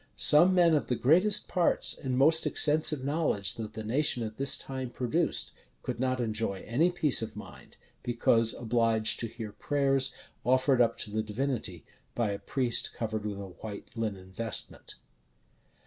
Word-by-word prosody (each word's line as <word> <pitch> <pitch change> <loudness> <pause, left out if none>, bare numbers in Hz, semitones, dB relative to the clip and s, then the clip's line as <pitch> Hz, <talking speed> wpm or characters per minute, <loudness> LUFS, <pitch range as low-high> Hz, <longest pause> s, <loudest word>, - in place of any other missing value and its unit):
Some 175 +5 +5
men 170 -2 +4
of 150 - +1
the 125 - 0
greatest 185 - +3
parts 180 -3 +1
and 130 -2 -3
most 160 +4 +4
extensive 150 -2 +3
knowledge 140 - -1
that 110 -2 -7
the 110 - -6
nation 125 +2 0
at 110 -1 -7
this 135 0 +4
time 130 -2 -6
produced, 130 +8 -1 0.3
could - - -5
not 130 0 -1
enjoy 110 -4 -3
any 150 +10 +2
peace 160 -8 +1
of 110 - -6
mind, - - -12 0.2
because 115 -1 +2
obliged 115 -2 +1
to 115 - -3
hear 110 -2 -8
prayers 135 +1 0 0.3
offered 130 0 +2
up 115 -1 +2
to 105 - -6
the 110 +1 -1
Divinity 110 - -4 0.3
by 115 -4 0
a 100 - -5
priest 125 -3 0
covered 110 -2 -4
with 100 -1 -5
a 100 -1 -8
white 105 -2 -8
linen 100 -5 -5
vestment. 115 +4 -4
120 Hz, 165 wpm, -29 LUFS, 110-140 Hz, 0.3 s, Some